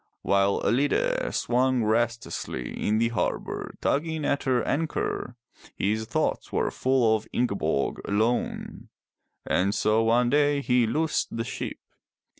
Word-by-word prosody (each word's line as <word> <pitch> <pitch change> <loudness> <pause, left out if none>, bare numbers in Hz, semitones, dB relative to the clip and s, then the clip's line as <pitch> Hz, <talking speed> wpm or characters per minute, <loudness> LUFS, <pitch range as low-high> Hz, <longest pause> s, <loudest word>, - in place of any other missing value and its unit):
While 100 0 +2
Ellide 135 +7 +1
swung 125 0 +1
restlessly 115 - -1
in 105 - 0
the 115 +1 +2
harbor 115 - -3
tugging 160 +1 0
at 140 - 0
her 125 -3 +2
anchor, 150 -4 -2 0.4
his 110 +3 0
thoughts 110 - -1
were - - 0
full 125 -4 +2
of 110 0 -5
Ingeborg 100 - 0
alone. 110 +4 -1 0.6
And 100 +3 +1
so 110 +1 +2
one 120 +2 +3
day 145 -1 +3
he 125 -3 +2
loosed 155 +1 -1
the 115 - -1
ship. - - -5
120 Hz, 125 wpm, -26 LUFS, 110-130 Hz, 0.6 s, one